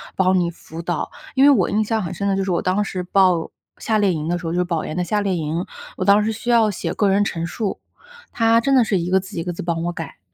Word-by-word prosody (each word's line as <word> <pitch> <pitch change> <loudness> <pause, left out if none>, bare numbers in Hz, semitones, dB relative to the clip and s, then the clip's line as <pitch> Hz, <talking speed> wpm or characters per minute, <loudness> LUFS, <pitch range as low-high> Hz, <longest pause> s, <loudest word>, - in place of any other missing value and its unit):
帮 190 0 +3
你 175 -1 +1
辅 165 0 -10
导。 170 -1 -3 0.3
因 270 +1 +5
为 - - +8
我 225 -11 +3
印 215 +1 +1
象 220 -1 -1
很 180 - -4
深 200 +3 -3
的 195 - +1
就 195 - 0
是 190 - -2
我 175 - +1
当 190 +3 +1
时 185 -2 -4
报 180 -2 +2 0.3
夏 220 - 0
令 205 -2 +3
营 155 -2 -3
的 175 +1 0
时 175 - -8
候， 165 - -2
就 175 - -1
是 180 - +1
保 170 -3 -2
研 155 - -5
的 180 - +1
夏 210 +2 0
令 195 -2 0
营， 165 +1 -2 0.3
我 - - -3
当 200 +2 +5
时 220 - 0
需 225 +3 -6
要 230 -2 +4
写 200 - -3
个 205 - +1
人 195 +1 +3
陈 170 -4 -3
述， 205 +1 -3 0.5
她 230 0 +4
真 275 +3 +2
的 255 - +6
是 200 -4 0
一 170 +1 -3
个 190 +1 +3
字 190 0 -10
一 - - -2
个 175 - -3
字 - - -6
帮 170 -1 -2
我 175 - -1
改。 165 - -8
190 Hz, 320 characters per minute, -21 LUFS, 175-210 Hz, 0.5 s, 为